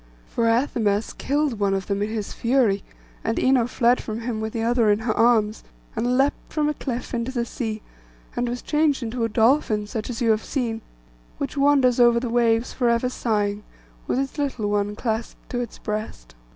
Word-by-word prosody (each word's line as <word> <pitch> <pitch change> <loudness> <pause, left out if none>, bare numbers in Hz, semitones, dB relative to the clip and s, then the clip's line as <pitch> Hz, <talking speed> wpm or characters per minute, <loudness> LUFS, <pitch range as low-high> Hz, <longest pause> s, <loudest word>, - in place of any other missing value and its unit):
For 230 - 0
Athamas 225 -3 +1
killed 285 -5 -1
one 200 -1 +2
of 190 -1 -3
them 200 0 -1
in 205 - 0
his 215 -2 -4
fury, 230 -5 +2 0.4
and 225 - -1
Ino 255 -3 +3
fled 245 0 +2
from 220 +1 -5
him 230 -2 -3
with 220 0 -3
the 225 0 -2
other 235 -1 +3
in 205 - +4
her 220 0 -1
arms, 225 -2 +3 0.3
and 245 +2 +1
leaped 275 +2 0
from 305 -1 +1
a 300 - +1
cliff 250 -4 -5
into 235 +1 -1
the 240 -3 -1
sea, 220 -4 -4 0.5
and 245 0 0
was 245 +1 -4
changed 300 -3 +1
into 230 +1 -2
a 230 - +1
dolphin, 225 -2 +2
such 215 +1 -5
as 235 - -4
you 235 -3 +3
have 215 0 +1
seen, 230 -5 -2 0.6
which 280 0 -4
wanders 275 -3 +4
over 240 -1 +6
the 240 -1 -3
waves 230 0 +2
for 245 -2 +1
ever 235 +2 +2
sighing, 210 -4 -1 0.4
with - - 0
its 275 +2 -2
little 250 -8 -1
one 205 0 0
clasped 225 0 -4
to 245 - -1
its 240 -2 -5
breast. 210 - -5
235 Hz, 200 wpm, -24 LUFS, 215-250 Hz, 0.6 s, over